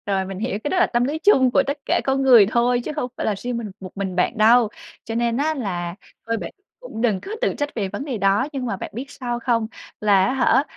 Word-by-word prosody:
Rồi, 195 -2 0
mình 190 0 -6
hiểu, 220 -1 -2
cái - - -1
đó 375 - 0
là 360 - +4
tâm 240 0 +1
lý 285 +5 -1
chung 270 -9 +4
của 275 - +4
tất 280 +1 -1
cả - - +1
con 270 0 0
người 245 -6 +7
thôi, 245 +1 +2
chứ - - -3
không 255 -5 -2
phải - - -3
là 210 - +1
riêng 245 +3 -4
mình 220 -4 -5
một 185 -2 -9
mình 190 -2 -3
bạn 180 +6 0
đâu. 225 +1 +5 0.3
Cho 225 - -5
nên 235 0 0
á 305 +3 +1
là, 180 - -4 0.3
thôi 230 0 0
bạn - - -6 0.3
cũng - - -7
đừng 220 -6 +2
có 400 - -8
tự - - +1
trách 290 -1 -1
về 205 -4 -1
vấn 205 +8 -5
đề 265 -6 -3
đó, 200 +6 +2
nhưng 265 -2 -3
mà 200 -5 -2
bạn - - -7
biết 245 +5 -5
sao 240 -2 -4
không? 230 -2 0 0.3
Là 200 -3 +4
á 225 - 0
hả, 265 +1 +3
235 Hz, 275 wpm, -22 LUFS, 205-265 Hz, 0.3 s, người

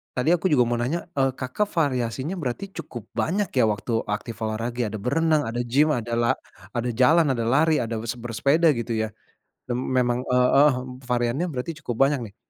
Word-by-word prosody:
tadi 125 +5 +1
aku 175 - -6
juga 125 -4 +5
mau 120 0 0
nanya, 160 +8 -1 0.2
eee, 135 -1 +3
Kakak 130 +11 -1
variasinya 130 +3 -1
berarti 130 +8 -3
cukup 120 -4 -7 0.2
banyak 195 +4 0
ya, - - +5
waktu 105 +4 -6 0.2
aktif 115 +1 -7
olahraga, 115 +3 -3
ya? - - -1
Ada 110 - -5
berenang, 155 +3 +2
ada 120 +2 -3
gym 150 +4 +4
ada 120 0 -4
la 120 - +2 0.5
ada 120 +1 -1
jalan, 160 +5 +5
ada 115 -2 -2
lari, 155 +6 +3
ada 115 0 -3 0.2
se 125 - -8
bersepeda, 140 +8 +2
gitu 115 0 -4
ya? 110 - -1 0.6
Mem 120 +1 -1 0.2
memang, 120 -1 +2
eee, 125 0 +4
eh, 150 0 +7 0.4
variannya 120 +7 +1
berarti 130 +3 -4
cukup 120 -5 -4
banyak, 140 -1 0
nih. 100 - -25
125 Hz, 190 wpm, -24 LUFS, 120-150 Hz, 0.6 s, eh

